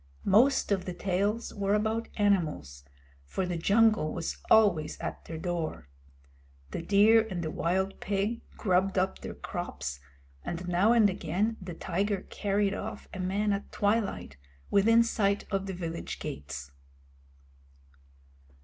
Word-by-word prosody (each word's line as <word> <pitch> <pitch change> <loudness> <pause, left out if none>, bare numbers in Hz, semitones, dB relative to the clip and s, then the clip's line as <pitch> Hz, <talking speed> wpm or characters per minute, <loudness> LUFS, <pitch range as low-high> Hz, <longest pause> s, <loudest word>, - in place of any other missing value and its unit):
Most 235 +5 +4
of 195 -2 +1
the 180 - -5
tales 200 +5 -1
were 200 0 +1
about 220 +2 0
animals, 160 - 0 0.4
for 75 - -3
the 180 -1 -2
jungle 205 -1 +3
was 65 0 -3
always 180 -9 +4
at - - -5
their 165 - -6
door. 165 - -3 0.8
The - - -3
deer 215 +4 +5
and 175 -3 -3
the 155 - -3
wild 190 +4 -1
pig 205 +3 -1 0.2
grubbed 190 0 +1
up 190 +1 0
their - - -7
crops, 70 +1 -5 0.4
and 175 +1 -5
now 180 +5 +3
and 230 -3 +6
again 190 +4 -1
the 180 -2 -7
tiger 195 +3 -1
carried 200 -1 0
off 215 +2 -6
a 190 - -6
man 200 +3 0
at 200 - -4
twilight, 205 - -1 0.3
within 225 +4 +5
sight 205 -3 0
of 195 0 -1
the 190 - -3
village 170 -2 -5
gates. 70 -1 -6
195 Hz, 140 wpm, -29 LUFS, 175-210 Hz, 0.8 s, and